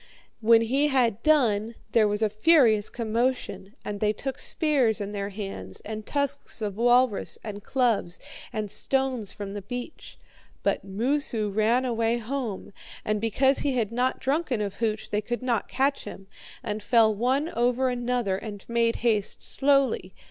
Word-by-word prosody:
When 230 Hz, 0 st, +5 dB
he 270 Hz, +6 st, +2 dB
had 240 Hz, -6 st, +1 dB
done, 230 Hz, -7 st, +2 dB, 0.2 s
there 220 Hz, -1 st, +4 dB
was 210 Hz, +1 st, 0 dB
a 215 Hz, -, +3 dB
furious 220 Hz, -3 st, +4 dB
commotion, 235 Hz, -2 st, -2 dB
and 205 Hz, -1 st, -4 dB
they 210 Hz, 0 st, +2 dB
took 270 Hz, +5 st, -5 dB
spears 275 Hz, -, +2 dB
in 205 Hz, 0 st, -4 dB
their 200 Hz, -1 st, -3 dB
hands, 195 Hz, -, -6 dB
and 215 Hz, 0 st, -7 dB
tusks 280 Hz, -2 st, -2 dB
of 210 Hz, -3 st, -3 dB
walrus, 240 Hz, -1 st, +2 dB
and 205 Hz, -2 st, -7 dB
clubs, 230 Hz, -9 st, 0 dB, 0.3 s
and 210 Hz, -2 st, -4 dB
stones 260 Hz, -7 st, -1 dB
from 200 Hz, -1 st, -7 dB
the 205 Hz, -, -5 dB
beach. 245 Hz, +7 st, -7 dB, 0.5 s
But -, -, 0 dB
Moosu 225 Hz, +1 st, -1 dB
ran 225 Hz, +5 st, +2 dB
away 230 Hz, -1 st, +1 dB
home, 235 Hz, -4 st, -4 dB, 0.3 s
and 210 Hz, -1 st, 0 dB
because 265 Hz, +5 st, +2 dB
he 280 Hz, -, 0 dB
had 225 Hz, -4 st, 0 dB
not 250 Hz, +2 st, 0 dB
drunken 275 Hz, -3 st, 0 dB
of 200 Hz, -2 st, -3 dB
hooch 220 Hz, -2 st, -2 dB
they 210 Hz, -, +1 dB
could 240 Hz, +4 st, -4 dB
not 240 Hz, -3 st, 0 dB
catch 275 Hz, +1 st, 0 dB
him, 195 Hz, -, -9 dB, 0.4 s
and 210 Hz, +1 st, -3 dB
fell 220 Hz, 0 st, +4 dB
one 260 Hz, +8 st, 0 dB
over 250 Hz, +1 st, +1 dB
another 240 Hz, -5 st, -1 dB
and 205 Hz, -1 st, -8 dB
made 235 Hz, 0 st, +1 dB
haste 210 Hz, -4 st, +1 dB
slowly. 270 Hz, -9 st, +1 dB
230 Hz, 160 wpm, -26 LUFS, 210-255 Hz, 0.5 s, When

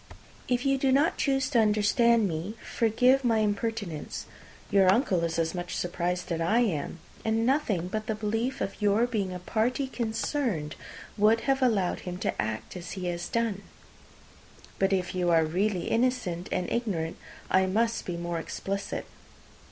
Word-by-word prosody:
If 245 Hz, +1 st, 0 dB
you 275 Hz, 0 st, +2 dB
do 265 Hz, 0 st, +2 dB
not 290 Hz, +6 st, +3 dB
choose 270 Hz, -2 st, +2 dB
to 240 Hz, -, +4 dB
understand 215 Hz, +1 st, +4 dB
me, 175 Hz, +5 st, -4 dB, 0.2 s
forgive 250 Hz, +4 st, +4 dB
my 230 Hz, -2 st, +3 dB
impertinence. 205 Hz, -5 st, -2 dB, 0.5 s
Your 195 Hz, -2 st, +6 dB
uncle 190 Hz, -6 st, +2 dB
is 165 Hz, 0 st, -1 dB
as 165 Hz, -1 st, 0 dB
much 175 Hz, -1 st, -4 dB
surprised 175 Hz, 0 st, -2 dB
as 165 Hz, -1 st, -1 dB
I 175 Hz, +8 st, +2 dB
am; 170 Hz, -8 st, -1 dB, 0.3 s
and 225 Hz, +1 st, +1 dB
nothing 235 Hz, -, +1 dB
but 215 Hz, +3 st, -4 dB
the 220 Hz, -, 0 dB
belief 225 Hz, +4 st, -2 dB
of 195 Hz, -, -4 dB
your 210 Hz, +3 st, +3 dB
being 210 Hz, -6 st, -2 dB
a 180 Hz, -, -4 dB
party 230 Hz, +8 st, 0 dB
concerned 225 Hz, -, -2 dB, 0.5 s
would 220 Hz, +2 st, +5 dB
have 270 Hz, -1 st, +1 dB
allowed 210 Hz, -8 st, +2 dB
him 180 Hz, -1 st, -6 dB
to -, -, -1 dB
act 110 Hz, -, -4 dB
as 180 Hz, -1 st, -6 dB
he 185 Hz, -2 st, -5 dB
has 175 Hz, 0 st, -4 dB
done. 230 Hz, -4 st, 0 dB, 1.2 s
But 195 Hz, 0 st, +2 dB
if 185 Hz, -2 st, 0 dB
you 180 Hz, -1 st, 0 dB
are 165 Hz, -1 st, +4 dB
really 185 Hz, +3 st, 0 dB
innocent 225 Hz, -8 st, 0 dB
and 180 Hz, -, -1 dB
ignorant, 185 Hz, -9 st, -1 dB, 0.3 s
I 190 Hz, 0 st, +4 dB
must 225 Hz, +4 st, +1 dB
be 175 Hz, -2 st, -4 dB
more 170 Hz, -1 st, -3 dB
explicit. 195 Hz, +4 st, -4 dB
205 Hz, 165 wpm, -28 LUFS, 180-235 Hz, 1.2 s, Your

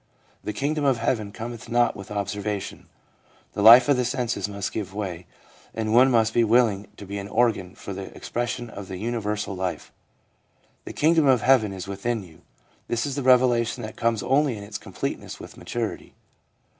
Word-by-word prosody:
' -, -, -35 dB
The -, -, -3 dB
kingdom 145 Hz, +7 st, -1 dB
of 135 Hz, -3 st, +3 dB
heaven 115 Hz, -3 st, -1 dB
cometh 115 Hz, +1 st, -7 dB
not 120 Hz, 0 st, +2 dB
with 100 Hz, -, -9 dB
observation/ 100 Hz, 0 st, -4 dB, 0.7 s
The -, -, -2 dB
life 120 Hz, +4 st, +9 dB
of 145 Hz, -2 st, +4 dB
the 125 Hz, -, +1 dB
senses 120 Hz, -3 st, -2 dB
must 100 Hz, 0 st, -4 dB
give 100 Hz, -2 st, -5 dB
way, 90 Hz, -4 st, -5 dB, 0.5 s
and 110 Hz, -1 st, -1 dB
one 125 Hz, +3 st, +7 dB
must 115 Hz, -2 st, +3 dB
be 120 Hz, -, +4 dB
willing 110 Hz, -3 st, +3 dB
to 100 Hz, -, -9 dB
be 100 Hz, +1 st, -5 dB
an 100 Hz, -, -6 dB
organ 110 Hz, -5 st, +1 dB
for 100 Hz, -, -7 dB
the 95 Hz, 0 st, -6 dB
expression 120 Hz, -1 st, -3 dB
of 100 Hz, -1 st, -9 dB
universal 105 Hz, 0 st, -3 dB
life. 90 Hz, -1 st, -4 dB, 0.5 s
' -, -, -40 dB
The -, -, -7 dB
kingdom 160 Hz, -1 st, +3 dB
of 125 Hz, -4 st, +4 dB
heaven 125 Hz, -6 st, +4 dB
is 95 Hz, -1 st, -7 dB
within 105 Hz, +3 st, -2 dB
you/ 80 Hz, -4 st, -16 dB, 0.5 s
This 115 Hz, -1 st, -1 dB
is 140 Hz, -, -3 dB
the 145 Hz, -, -2 dB
revelation 125 Hz, -2 st, +3 dB
that 110 Hz, -, -7 dB
comes 115 Hz, -3 st, 0 dB
only 135 Hz, -3 st, +2 dB
in 100 Hz, -, -8 dB
its 105 Hz, +1 st, -7 dB
completeness -, -, -5 dB
with -, -, -11 dB
maturity. 115 Hz, -2 st, -5 dB
110 Hz, 185 wpm, -25 LUFS, 100-120 Hz, 0.7 s, life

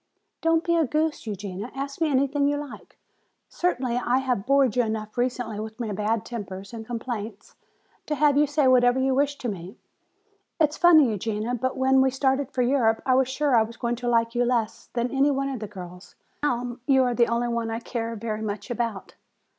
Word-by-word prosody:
"Don't 330 Hz, 0 st, +2 dB
be 340 Hz, -, +1 dB
a 330 Hz, -, +3 dB
goose, 305 Hz, -1 st, -1 dB
Eugenia, 200 Hz, +1 st, -5 dB
ask 275 Hz, +3 st, -5 dB
me 320 Hz, -, +3 dB
anything 280 Hz, +1 st, +2 dB
you 290 Hz, 0 st, +1 dB
like. 290 Hz, -2 st, -9 dB, 0.5 s
Certainly 255 Hz, -9 st, -1 dB
I 250 Hz, 0 st, +1 dB
have 250 Hz, -5 st, -1 dB
bored 275 Hz, -4 st, +3 dB
you 250 Hz, -, +4 dB
enough 220 Hz, -2 st, -3 dB
recently 245 Hz, -3 st, -2 dB
with 220 Hz, +2 st, -7 dB
my 225 Hz, -3 st, -3 dB
bad 210 Hz, +1 st, -1 dB
tempers 195 Hz, -3 st, -7 dB
and 225 Hz, -1 st, -6 dB
complaints 225 Hz, -3 st, -6 dB, 0.5 s
to 300 Hz, -, -1 dB
have 295 Hz, -1 st, +3 dB
you 295 Hz, +1 st, +4 dB
say 290 Hz, -1 st, +2 dB
whatever 250 Hz, 0 st, +4 dB
you 265 Hz, 0 st, +2 dB
wish 285 Hz, +2 st, +1 dB
to 245 Hz, -, -5 dB
me. 190 Hz, -3 st, -6 dB, 0.8 s
It's 305 Hz, -1 st, +2 dB
funny, 315 Hz, -8 st, +6 dB
Eugenia, 215 Hz, +3 st, -2 dB
but 260 Hz, +2 st, -2 dB
when 265 Hz, 0 st, +4 dB
we 265 Hz, -, +4 dB
started 265 Hz, 0 st, 0 dB
for 255 Hz, -2 st, 0 dB
Europe 240 Hz, -3 st, +2 dB
I 260 Hz, -, +3 dB
was 260 Hz, 0 st, +3 dB
sure 275 Hz, 0 st, +1 dB
I 225 Hz, -, +6 dB
was 225 Hz, +1 st, -4 dB
going 240 Hz, -1 st, -1 dB
to 245 Hz, 0 st, -5 dB
like 230 Hz, -1 st, +2 dB
you 245 Hz, 0 st, +2 dB
less 235 Hz, -3 st, -1 dB
than 240 Hz, 0 st, -1 dB
any 275 Hz, +1 st, +3 dB
one 275 Hz, -1 st, 0 dB
of 265 Hz, -3 st, -4 dB
the 215 Hz, -, -5 dB
girls. 180 Hz, -2 st, -11 dB, 0.3 s
Now 245 Hz, -3 st, -1 dB
you 265 Hz, -2 st, +5 dB
are 245 Hz, -1 st, +1 dB
the 235 Hz, 0 st, +3 dB
only 235 Hz, +1 st, 0 dB
one 235 Hz, -1 st, -2 dB
I 225 Hz, 0 st, -3 dB
care 230 Hz, -1 st, -4 dB
very 215 Hz, 0 st, -4 dB
much 215 Hz, +3 st, -4 dB
about." 230 Hz, -4 st, -3 dB
245 Hz, 210 wpm, -25 LUFS, 225-270 Hz, 0.8 s, funny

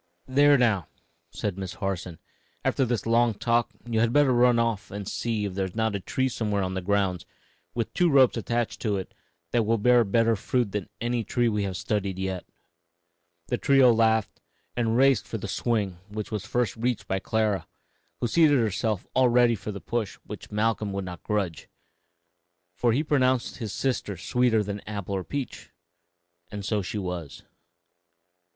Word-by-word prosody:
] -, -, -45 dB
"There, 145 Hz, +2 st, +5 dB
now!" 110 Hz, -7 st, +2 dB, 0.4 s
said 100 Hz, -2 st, -4 dB
Miss 95 Hz, -2 st, -5 dB
Harson; 95 Hz, -3 st, -4 dB, 0.5 s
"after 135 Hz, -, +2 dB
this 120 Hz, -4 st, -1 dB
long 115 Hz, 0 st, +3 dB
talk, 120 Hz, +2 st, +1 dB, 0.2 s
you 115 Hz, -2 st, 0 dB
had 115 Hz, 0 st, +3 dB
better 145 Hz, -1 st, +4 dB
run 120 Hz, 0 st, +4 dB
off 115 Hz, -5 st, 0 dB
and 100 Hz, -1 st, -6 dB
see 110 Hz, -3 st, -2 dB
if 100 Hz, -, -4 dB
there 95 Hz, 0 st, -1 dB
is 90 Hz, -, -12 dB
not 110 Hz, -1 st, 0 dB
a -, -, -1 dB
tree 130 Hz, +7 st, -1 dB
somewhere 105 Hz, -5 st, -1 dB
on 95 Hz, 0 st, -2 dB
the 95 Hz, -, -2 dB
grounds, 95 Hz, -2 st, 0 dB, 0.5 s
with 115 Hz, -2 st, -2 dB
two 175 Hz, -1 st, +3 dB
ropes 135 Hz, -4 st, +5 dB
attached 120 Hz, 0 st, -2 dB
to 105 Hz, -4 st, 0 dB
it, 95 Hz, -, -6 dB, 0.4 s
that 120 Hz, -, +3 dB
will 115 Hz, +1 st, +1 dB
bear 120 Hz, +2 st, +5 dB
better 115 Hz, +2 st, +2 dB
fruit 120 Hz, +1 st, -1 dB
than 105 Hz, -2 st, -4 dB
any 120 Hz, 0 st, -1 dB
tree 120 Hz, +3 st, +1 dB
we 105 Hz, -2 st, 0 dB
have 95 Hz, -2 st, -3 dB
studied 100 Hz, -3 st, -2 dB
yet." 95 Hz, -1 st, -3 dB, 1.0 s
The 125 Hz, -, 0 dB
trio 135 Hz, -3 st, +5 dB
laughed 110 Hz, -1 st, +1 dB, 0.3 s
and 115 Hz, -1 st, +1 dB
raced 135 Hz, 0 st, +4 dB
for -, -, -4 dB
the -, -, -5 dB
swing, 100 Hz, -7 st, -1 dB
which 105 Hz, +1 st, -5 dB
was 105 Hz, -3 st, -4 dB
first 120 Hz, -5 st, 0 dB
reached 120 Hz, 0 st, -1 dB
by 95 Hz, -, 0 dB
Clara, 110 Hz, -1 st, 0 dB, 0.5 s
who 120 Hz, -, 0 dB
seated 150 Hz, +1 st, +4 dB
herself 110 Hz, -2 st, 0 dB
all 130 Hz, -1 st, +4 dB
ready 120 Hz, 0 st, +4 dB
for 105 Hz, 0 st, -5 dB
the 100 Hz, -, -6 dB
push 115 Hz, -5 st, -2 dB
which -, -, -9 dB
Malcolm 105 Hz, -1 st, 0 dB
would 100 Hz, -1 st, -3 dB
not 90 Hz, -1 st, -7 dB
grudge, 100 Hz, -7 st, -2 dB, 1.0 s
for 120 Hz, +6 st, +1 dB
he 135 Hz, +7 st, +1 dB
pronounced 130 Hz, -5 st, +1 dB
his 110 Hz, -5 st, -5 dB
sister 115 Hz, -6 st, -2 dB
sweeter 115 Hz, +3 st, +2 dB
than 100 Hz, 0 st, -4 dB
apple 100 Hz, -2 st, -4 dB
or 95 Hz, -, -2 dB
peach; 140 Hz, +2 st, -5 dB, 0.8 s
and 100 Hz, 0 st, -6 dB
so 105 Hz, 0 st, 0 dB
she 95 Hz, +3 st, -4 dB
was. 90 Hz, -6 st, -5 dB
110 Hz, 180 wpm, -26 LUFS, 100-120 Hz, 1.0 s, There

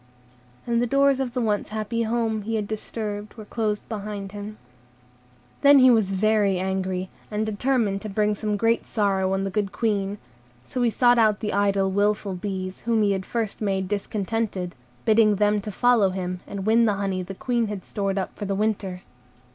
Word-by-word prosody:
And 235 Hz, -1 st, +1 dB
the 245 Hz, -, +1 dB
doors 275 Hz, +1 st, +3 dB
of 255 Hz, -2 st, -3 dB
the 250 Hz, -, +1 dB
once 210 Hz, -3 st, 0 dB
happy 215 Hz, +2 st, -2 dB
home 225 Hz, -1 st, 0 dB
he 225 Hz, +2 st, -3 dB
had 210 Hz, -2 st, -1 dB
disturbed 210 Hz, -1 st, -5 dB
were 215 Hz, -2 st, -9 dB
closed 210 Hz, -1 st, -2 dB
behind 205 Hz, -2 st, -5 dB
him. 205 Hz, +1 st, -7 dB, 1.0 s
Then 285 Hz, 0 st, +8 dB
he 255 Hz, -1 st, +7 dB
was 220 Hz, -5 st, +3 dB
very 205 Hz, -1 st, +2 dB
angry, 190 Hz, 0 st, -2 dB, 0.2 s
and 215 Hz, 0 st, -1 dB
determined 215 Hz, -2 st, 0 dB
to 215 Hz, -, -6 dB
bring 210 Hz, +1 st, +1 dB
some 210 Hz, 0 st, -2 dB
great 230 Hz, +2 st, +1 dB
sorrow 195 Hz, -3 st, +1 dB
on 195 Hz, 0 st, 0 dB
the 195 Hz, -, -2 dB
good 200 Hz, -1 st, -1 dB
Queen. 205 Hz, -3 st, -1 dB, 0.5 s
So 250 Hz, -, -4 dB
he 240 Hz, -, +4 dB
sought 245 Hz, +1 st, +4 dB
out 215 Hz, -2 st, +4 dB
the 210 Hz, -, -2 dB
idle, 200 Hz, -1 st, +2 dB
wilful 205 Hz, 0 st, +1 dB
bees, 185 Hz, 0 st, -5 dB
whom 225 Hz, -2 st, +1 dB
he 205 Hz, -, +3 dB
had 190 Hz, -1 st, -2 dB
first 225 Hz, -3 st, -3 dB
made 195 Hz, -2 st, 0 dB
discontented, 200 Hz, -2 st, -2 dB, 0.3 s
bidding 215 Hz, -1 st, +5 dB
them 210 Hz, +1 st, +2 dB
follow 215 Hz, +1 st, +3 dB
him, 185 Hz, -1 st, -4 dB
and 195 Hz, -1 st, -5 dB
win 230 Hz, +2 st, +4 dB
the 210 Hz, -2 st, +2 dB
honey 195 Hz, -2 st, -2 dB
the 190 Hz, +2 st, -7 dB
Queen 235 Hz, +1 st, 0 dB
had 205 Hz, -3 st, -6 dB
stored 195 Hz, -1 st, -2 dB
up 190 Hz, -, -3 dB
for 205 Hz, -, -5 dB
the 195 Hz, 0 st, -1 dB
winter. 195 Hz, -3 st, -2 dB
210 Hz, 185 wpm, -24 LUFS, 195-225 Hz, 1.0 s, Then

